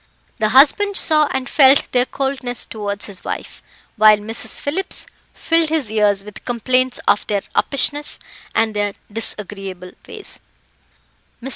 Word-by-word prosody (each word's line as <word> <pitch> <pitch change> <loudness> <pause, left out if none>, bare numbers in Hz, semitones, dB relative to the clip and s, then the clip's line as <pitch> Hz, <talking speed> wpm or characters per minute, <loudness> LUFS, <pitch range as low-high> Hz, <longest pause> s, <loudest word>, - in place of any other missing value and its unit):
The 215 -1 +1
husband 310 - +4
saw 305 -2 +3
and 265 -1 -3
felt 275 0 +4
their 250 0 +2
coldness 265 -3 -3
towards 205 -2 -4
his 200 -2 -3
wife, - - -6 0.4
while 215 0 +7
Mrs. 220 +2 -3
Phillips 365 +7 -2 0.3
filled 330 -1 0
his 305 -9 -1
ears 205 -2 +2
with 210 0 -11
complaints 255 +1 0
of 205 - +2
their 205 -2 -1
uppishness, 290 +1 +1 0.4
and 225 -1 +1
their 205 -1 -1 0.2
disagreeable 195 -4 -3 0.2
ways. 425 - -9 1.0
Mr. 260 - -7
245 Hz, 135 wpm, -19 LUFS, 210-280 Hz, 1.0 s, while